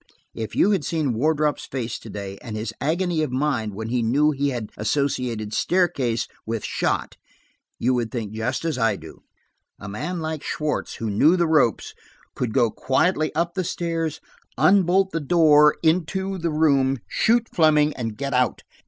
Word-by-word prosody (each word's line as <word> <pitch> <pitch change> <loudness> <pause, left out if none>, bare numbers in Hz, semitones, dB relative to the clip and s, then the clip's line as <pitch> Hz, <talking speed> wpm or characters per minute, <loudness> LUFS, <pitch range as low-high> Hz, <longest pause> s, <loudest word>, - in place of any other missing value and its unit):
If 110 -1 -6
you 205 - +4
had 190 -7 +1
seen 150 -3 -1
Wardrop's 150 +4 0
face 120 -4 -4
to 115 - -11
day, 100 -1 -7
and 115 -3 -7
his 110 +1 -4
agony 170 +1 0
of 155 - -1
mind 130 -6 -1
when 110 +2 -5
he 125 0 0
knew 140 +7 +3
he 140 0 0
had 120 -5 -5
associated 115 -2 -1
'staircase' 155 -11 +1 0.2
with 115 -1 -4
'shot,' - - -2 0.6
you 125 +3 +1
would 120 -2 -1
think 115 -4 -4
just 115 +8 -2
as 155 -6 -1
I 115 -3 +2
do. 80 -3 -12 0.6
A 105 - -8
man 170 - -4
like 160 -2 -4
Schwartz, 150 -1 -3
who 110 -2 -3
knew 150 - +4
the 170 - +2
ropes, 150 - +2 0.4
could 125 -3 -2
go 120 -2 +2
quietly 155 - +1
up 170 +1 0
the 185 - -1
stairs, 165 -2 -2 0.4
unbolt 190 0 +4
the 165 - -1
door 150 -1 +5
into 185 +4 0
the 170 0 -1
room, 140 -4 +2
shoot 230 +1 +2
Fleming 155 -2 +4
and 115 -4 -5
get 140 +2 -3
out. 125 -1 +1
145 Hz, 170 wpm, -23 LUFS, 115-165 Hz, 0.6 s, door